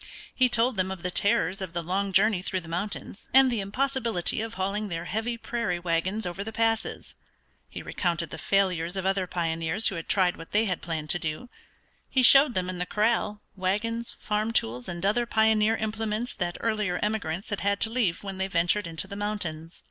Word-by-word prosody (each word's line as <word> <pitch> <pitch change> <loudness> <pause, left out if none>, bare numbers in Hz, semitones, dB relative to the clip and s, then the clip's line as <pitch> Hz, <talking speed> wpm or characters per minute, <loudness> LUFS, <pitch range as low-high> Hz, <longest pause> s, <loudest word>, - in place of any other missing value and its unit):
He 255 -1 +3
told 240 0 +3
them 185 0 +1
of 190 -2 -6
the 180 - -1
terrors 195 0 +2
of 185 -3 -5
the 170 -1 -2
long 195 +4 -1
journey 200 0 +4
through 185 0 -2
the 165 - -12
mountains 195 +4 -4
and 265 -1 +7
the 235 - -1
impossibility 230 -2 -1
of 225 0 -5
hauling 195 +3 -2
their 165 -2 -4
heavy 225 +5 -2
prairie 230 -7 -2
wagons 175 +5 -1
over 180 +3 -4
the 220 - -6
passes; 225 0 -1 0.6
he - - -7
recounted 170 -3 -2
the 160 - -7
failures 185 -1 +1
of 190 - -2
other 190 -1 +1
pioneers 165 +3 +1
who 195 - -5
had 165 - -7
tried 185 -3 +3
what 165 - -11
they 215 +2 +3
had 180 -4 -2
planned 160 -3 -3
to 175 - +1
do; 160 +10 -4 0.6
he 260 - +2
showed 275 +1 +8
them 185 -1 0
in 185 -1 -5
the 180 - -2
corral 210 0 0
wagons, 215 +5 -2
farm 215 +1 -1
tools, 120 - 0
and 175 +2 -4
other 235 +4 +2
pioneer 220 0 +3
implements 220 +2 -2
that 175 -2 -3
earlier 210 -5 0
emigrants 205 -3 -2
had 205 - -1
had 200 0 0
to 220 - +2
leave 215 -9 0
when 195 -1 -6
they 190 - 0
ventured 175 +2 +1
into 165 +2 -3
the 200 - -7
mountains. 180 -6 -4
195 Hz, 200 wpm, -27 LUFS, 175-220 Hz, 0.6 s, showed